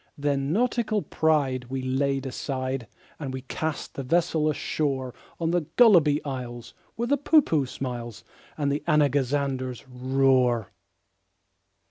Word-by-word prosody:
Then 140 -1 0
nautical 220 0 +1
pride 140 -5 +1
we 130 +1 -4
laid 135 +1 0
aside, 130 -2 -3 0.3
And 140 -4 -4
we 130 0 -5
cast 155 +3 -4
the - - -5
vessel 160 +2 +1
ashore 135 -4 -2 0.3
On 165 -1 0
the 175 -4 0
Gulliby 170 -11 +6
Isles, 125 -4 -6 0.2
where 235 +1 -2
the 285 +1 +2
Poohpooh 260 - +3
smiles, 120 -3 -6 0.3
And 145 -2 0
the 145 - -1
Anagazanders 140 -4 +1
roar. 130 -3 +2
140 Hz, 120 wpm, -26 LUFS, 130-155 Hz, 0.3 s, Gulliby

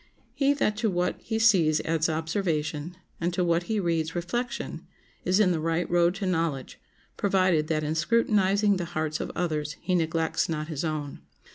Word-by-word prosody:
He 275 +2 +2
that 215 -7 0
to 220 -1 +1
what 180 -1 -1
he 220 - -2
sees 185 -9 +4
adds 165 0 0
observation, 160 -1 -2 0.2
and 170 +1 0
to 180 - +1
what 170 0 +1
he 220 -1 +1
reads, 165 -3 -1
reflection, 240 +9 -3 0.4
is 185 +3 +3
in 195 -4 +4
the 165 - 0
right 165 +2 0
road 175 +1 +3
to 195 0 -3
knowledge, 165 -7 -2 0.4
provided 185 -6 +2
that 155 -1 0
in 150 +1 -1
scrutinizing 200 +2 +2
the 175 - -3
hearts 155 -1 -1
of - - -3
others 155 -4 -1
he 185 - -2
neglects 165 -2 0
not 155 -1 -3
his 155 -2 -3
own. 155 -3 -4
170 Hz, 175 wpm, -27 LUFS, 155-195 Hz, 0.4 s, sees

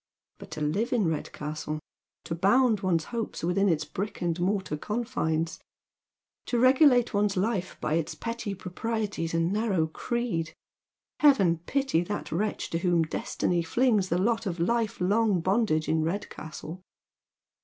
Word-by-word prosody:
But - - -11
to - - -6
live 195 +11 0
in 220 -7 +2
Redcastle, 155 -1 -4 0.4
to - - -4
bound 210 +6 +3
one's 180 -5 +1
hopes 230 -7 -3
within 190 +4 +2
its 160 -3 +1
brick 205 +3 -5
and 175 -1 -1
mortar 190 -3 0
confines, 165 -5 -2 0.9
to 245 - 0
regulate 255 -1 +5
one's 205 -1 +1
life 190 -2 -1
by 155 - -1
its 165 0 -1
petty 230 -3 -4
proprieties 195 -2 -3
and 165 +3 +1
narrow 205 -6 +1
creed 170 -2 -3 0.6
1 295 - +8
Heaven 190 -12 +3
pity 270 -11 +1
that 205 +4 -4
wretch 205 +7 -2
to 165 - 0
whom 175 -2 +2
destiny 170 +2 -1
flings 210 +2 +2
the 170 - +1
lot 225 +3 +1
of 175 -2 -3
life 230 +5 0
long 205 +1 +2
bondage 185 -3 +1
in 160 0 +2
Redcastle. 165 -1 -5
190 Hz, 145 wpm, -28 LUFS, 165-225 Hz, 0.9 s, 1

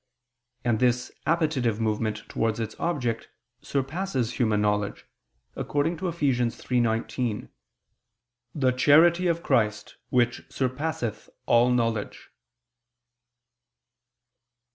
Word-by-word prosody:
And 115 -3 +2
this 125 0 +1 0.2
appetitive 150 -9 +1
movement 110 -1 -1
towards 115 0 -1
its 110 -1 -3
object 125 -10 -2 0.3
surpasses 135 - -2
human 110 -4 +2
knowledge, 105 -1 0 0.5
according 145 +4 0
to 185 - -3
Eph. 170 -1 -5
3:19: 120 -3 0 1.1
"The 130 -4 +2
charity 165 +7 +5
of 170 0 0
Christ 105 -2 0
which 120 -1 +1
surpasseth 130 -3 -3 0.2
all 120 +1 +4
knowledge." 115 -4 -1
125 Hz, 90 wpm, -26 LUFS, 110-145 Hz, 1.1 s, charity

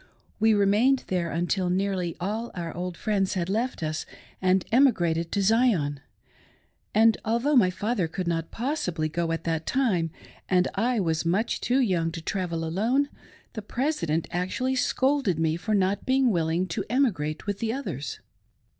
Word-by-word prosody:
We 220 0 +4
remained 210 +7 +3
there 175 -2 0
until 175 +2 0
nearly 185 -2 -1
all 215 +6 -3
our 170 -2 -5
old 180 0 -4
friends 200 -2 0
had 175 -1 -1
left 225 -1 -1
us 155 0 -3 0.3
and 185 0 +2
emigrated 175 -11 +3
to 200 - 0
Zion; 195 - +2 0.9
and 225 +1 +4
although 235 +7 +1
my 210 -8 +6
father 205 0 -1
could 180 +2 -4
not 165 -1 -1
possibly 225 - -2
go 165 +1 -1
at 165 - -2
that 160 -1 -2
time, 205 -11 +1 0.4
and 180 -1 +3
I 235 +4 +1
was 165 -4 0
much 190 +7 0
too 250 +2 +1
young 175 -8 +1
to 165 - -5
travel 170 -3 -2
alone, 230 - +1 0.4
the 220 - -5
President 205 - -1
actually 190 +9 -1
scolded 260 - +1
me 160 -1 +1
for 210 +5 -1
not 195 0 +1
being 260 -1 +3
willing 165 0 +1
to 200 +4 -2
emigrate 195 - 0
with 205 -1 -3
the 225 -1 -1
others. 155 - -5
190 Hz, 160 wpm, -26 LUFS, 170-230 Hz, 0.9 s, my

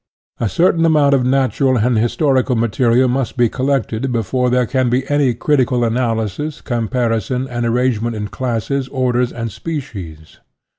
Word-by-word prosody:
A 115 - 0
certain 170 - +2
amount 150 -3 +4
of 135 -2 +3
natural 130 0 +1
and 120 +2 +1
historical 130 +3 +1
material 115 +2 +2
must 125 -1 -2
be 120 -2 +3
collected 130 -2 -1
before 125 +2 0
there 125 0 +2
can 130 +1 0
be 130 +2 0
any 140 -4 +2
critical 125 -2 +1
analysis, 115 +4 -2
comparison, 120 0 -1
and 120 -2 -2
arrange 120 -1 +1
ment 115 0 -2
in 105 -1 -4
classes, 130 +3 -2
orders, 125 -2 0
and 115 -2 -5
species. 95 - -7
125 Hz, 150 wpm, -17 LUFS, 115-135 Hz, -, amount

